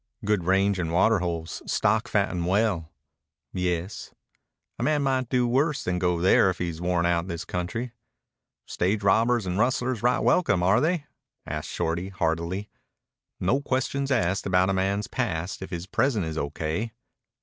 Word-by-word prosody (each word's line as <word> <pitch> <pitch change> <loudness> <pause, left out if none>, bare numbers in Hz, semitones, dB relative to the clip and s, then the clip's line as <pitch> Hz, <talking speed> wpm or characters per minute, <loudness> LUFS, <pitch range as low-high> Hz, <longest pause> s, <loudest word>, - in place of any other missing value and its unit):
"Good 105 -4 +1
range 95 +1 +2
and 85 -2 -2
water 95 +5 +4
holes. 85 -2 -4
Stock - - +1
fatten 85 -1 0
well." 95 -4 +1 0.6
"Yes." 90 +1 -3 0.6
"A - - -3
man 145 +3 +2
might 130 -3 0
do 125 -2 +2
worse 140 +5 +1
than 90 -1 -1
go 90 -1 +1
there 95 +2 +5
if 90 - -2
he's 85 -2 -4
worn 90 -1 +1
out 85 0 +1
this 85 -1 -5
country." 90 +8 -3 0.7
"Stage 100 +4 -1
robbers 115 +3 +3
and 90 +2 -2
rustlers 125 -1 +1
right 125 +1 +3
welcome, 100 - +2
are 95 +6 +4
they?" 160 -1 0 0.4
asked - - -4
Shorty 85 +3 -2
hardily. 90 +2 -2 0.7
"No 120 +10 +1
questions 135 0 -1
asked 95 -7 +1
about 90 0 +3
a - - 0
man's 100 +2 0
past 90 -8 -3
if 95 - -6
his 85 -1 -5
present 110 -1 +1
is 80 -1 -4
O.K." 80 +9 -3
95 Hz, 160 wpm, -26 LUFS, 85-120 Hz, 0.7 s, there